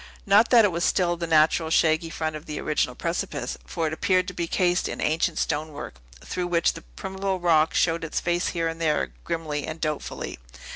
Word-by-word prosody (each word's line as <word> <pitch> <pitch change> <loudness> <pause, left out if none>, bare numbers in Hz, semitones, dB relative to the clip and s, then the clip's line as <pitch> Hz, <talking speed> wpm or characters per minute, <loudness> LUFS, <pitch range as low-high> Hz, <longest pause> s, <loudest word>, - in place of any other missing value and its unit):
Not 210 +3 +5
that 235 -3 +7
it 200 - +2
was 170 0 -2
still 175 -2 +2
the 170 0 -4
natural, 160 0 +3
shaggy 160 0 +2
front 160 -1 -3
of 155 - -9
the 150 - -4
original 150 - 0
precipice; - - -3
for 165 - -2
it 155 - -1
appeared 185 +3 +1
to - - -8
be 170 -1 -2
cased 180 0 +1
in - - -5
ancient 160 +2 0
stonework, 150 - -3 0.3
through 180 -1 -2
which 170 -1 +2
the - - -9
primeval 190 - -3
rock 160 -3 +3
showed 165 -1 +2
its 165 - -2
face 175 0 0
here 165 -2 -1
and 165 0 -5
there 155 -2 +1
grimly 155 -4 -3
and 155 +1 -5
doubtfully. 155 - -4
165 Hz, 200 wpm, -25 LUFS, 155-175 Hz, 0.3 s, that